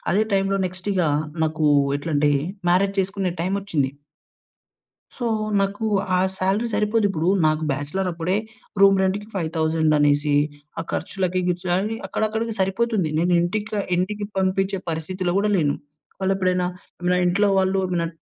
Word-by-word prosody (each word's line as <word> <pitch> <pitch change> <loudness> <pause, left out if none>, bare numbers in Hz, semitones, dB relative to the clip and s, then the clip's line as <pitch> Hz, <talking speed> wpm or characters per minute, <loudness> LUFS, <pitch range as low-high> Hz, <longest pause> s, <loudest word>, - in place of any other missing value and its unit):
అదే 205 +4 +3
టైంలో 195 0 +2
నెక్స్టిగా, 185 -1 -1 0.4
నాకూ 155 -1 +1 0.3
ఎట్లంటే, 145 -1 +1 0.4
మ్యారేజ్ 195 +3 +3
చేసుకునే 190 -1 -1
టైమోచ్చింది... 180 -7 -1 1.3
సో, 240 - -3 0.3
నాకు 200 +3 -1 0.3
ఆ - - +3 0.2
సాలరీ 195 +5 +1
సరిపోదిప్పుడూ. 205 -6 +1 0.2
నాకు 155 0 +1
బ్యాచలరప్పుడే 170 +5 -2 0.5
రూమ్ 195 -1 +6
రెంట్‌కి 200 +2 -1
5,000 160 -3 +1
అనేసి, 145 0 +3 0.5
ఆ - - -2
ఖర్చులకి, 185 -1 -1
గిర్చు‌లని 180 +4 0
అక్కడక్కడికి 220 +1 -1
సరిపోతుంది. 195 -2 +1
నేను 175 +1 +2
ఇంటిక 210 +5 -2 0.2
ఇంటికి 205 +3 -1
పంపించే 190 0 0
పరిస్థితిలో 175 +3 -2
గూడా 210 +1 +1
లేను. 145 -4 +1 0.4
వాళ్ళేప్పుడైనా, 185 -1 +1 0.3
ఏమైనా 180 0 +2
ఇంట్లో 200 +3 +2
వాళ్ళు 190 0 +2 0.2
నన్ 165 0 -3
185 Hz, 120 wpm, -23 LUFS, 165-195 Hz, 1.3 s, రూమ్